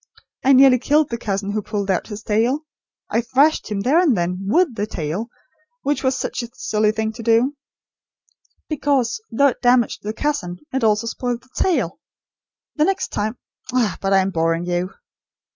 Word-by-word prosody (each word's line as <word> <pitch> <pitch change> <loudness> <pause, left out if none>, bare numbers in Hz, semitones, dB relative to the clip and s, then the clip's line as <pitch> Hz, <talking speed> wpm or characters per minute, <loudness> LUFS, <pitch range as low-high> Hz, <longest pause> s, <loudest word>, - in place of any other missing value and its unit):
I 275 - +5
nearly 260 -1 +7
killed 295 +2 +2
the 235 - -1
cousin 200 -1 -2
who 215 +1 -1
pulled 200 -1 -2
out 180 - -1
his 210 -1 -7
tail. 240 +8 +1 0.5
I 230 - +2
thrashed 275 +5 +2
him, 205 -2 -2
then 285 - +4
and 290 - +3
there, 170 -1 +1
WITH 230 - +1
the 210 -1 -3
tail; 170 +4 -3 0.6
which 285 +1 0
was 260 0 +1
such - - -3
a 235 - -7
silly 215 0 +1
thing 220 0 -2
to 230 - -8
do; 230 +5 +2 1.1
because, 285 - 0
though 280 +5 +4
it - - -7
damaged 245 -2 +3
the 210 - -3
cousin, 220 -11 -2 0.2
it 265 - 0
also 215 0 +2
spoiled 240 +1 -3
the 255 - -24
tail. 275 - 0 0.8
The 305 - +4
next 385 +1 0
time 215 +3 -2 0.4
ah, 235 -7 +1
but 195 - -1
I 195 -1 +5
am 190 +1 -1
boring 165 0 0
you!" 175 +1 -1
230 Hz, 180 wpm, -21 LUFS, 205-270 Hz, 1.1 s, nearly